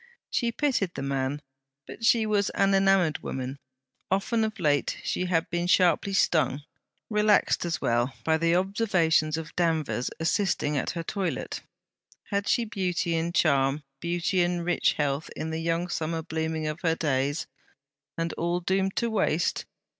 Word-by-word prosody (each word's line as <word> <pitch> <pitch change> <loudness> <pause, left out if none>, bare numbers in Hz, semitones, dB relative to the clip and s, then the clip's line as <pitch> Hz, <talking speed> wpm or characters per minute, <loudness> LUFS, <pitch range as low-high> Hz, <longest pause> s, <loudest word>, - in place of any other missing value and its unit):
She 235 -2 +1
pitied 235 - 0
the 135 - -4
man, 135 +1 -2 0.4
but - - -10
she 230 -1 +4
was 205 -2 +1
an 195 0 +3
enamoured 195 -4 +3
woman. 130 +1 -5 0.5
Often 210 +4 +1
of 220 0 -2
late 145 -3 +1
she 180 - -1
had 165 -2 +1
been 175 0 -1
sharply 185 +2 +3
stung, 155 -6 +2 0.5
relaxed 210 -3 +3
as 170 -1 -2
well, 120 +2 +1
by 160 0 +2
the 165 +1 +2
observations 180 -5 +2
of 160 -1 -7
Danvers 160 -7 0
assisting 165 -3 0
at 135 - -1
her 165 - -2
toilette. 190 +1 -3 0.7
Had 200 0 0
she 235 - +2
beauty 180 -4 -1
and 165 +1 -1
charm, 140 -1 +2 0.2
beauty 175 +3 0
and 175 -1 0
rich 175 - +2
health 145 +1 -1
in 160 - -4
the 160 0 -3
young 165 +1 0
summer 165 -1 -2
blooming 160 -1 -2
of 155 +2 -4
her 165 -1 +2
days? 145 -1 0 0.7
and 165 0 -2
all 170 +1 -1
doomed 190 +2 0
to 235 -1 0
waste? 175 -6 0
170 Hz, 155 wpm, -27 LUFS, 155-195 Hz, 0.7 s, she